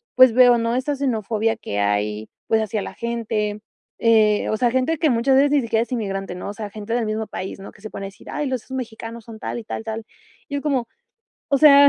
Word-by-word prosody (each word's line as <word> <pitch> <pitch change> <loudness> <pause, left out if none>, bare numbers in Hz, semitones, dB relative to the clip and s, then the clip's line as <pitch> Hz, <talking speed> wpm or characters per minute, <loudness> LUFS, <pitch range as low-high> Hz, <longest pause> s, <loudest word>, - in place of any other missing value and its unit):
pues, 255 -2 +8
veo, 245 0 +7
¿no?, 230 +1 0
esta 275 +3 0
xenofobia 225 -4 0
que 105 - -4
hay, 105 +1 0 0.2
pues, 220 0 +3
hacia 215 -1 -1
la - - -6
gente, 220 -3 -2 0.4
eh, 215 -2 +4
o 215 - 0
sea, 240 0 +2
gente 260 +6 +1
que 310 0 +3
muchas 250 +3 +3
veces 280 +1 +5
ni 290 -2 +4
siquiera 230 -1 +1
es 240 - -14
inmigrante, 195 -6 -2
¿no?, 180 - -5
o - - -4
sea, 210 -1 -6
gente 215 +2 -5
del 240 -2 +1
mismo 215 0 -2
país, 190 +1 -6
¿no?, 195 - -9
que - - -20
se 215 - -7
ponen 195 - -6
a - - -3
decir: 195 - -15
"Ay, 295 - -2
los 255 -2 -3
mexicanos 230 -2 -5
son 225 -2 -9
tal - - -4
y - - -8
tal, 220 - -5
tal", 225 0 -4 0.5
y 285 - -3
es 280 - -1
como, 265 -6 0 0.6
o 280 - +5
sea, 285 -1 +9
230 Hz, 240 wpm, -22 LUFS, 210-255 Hz, 0.6 s, sea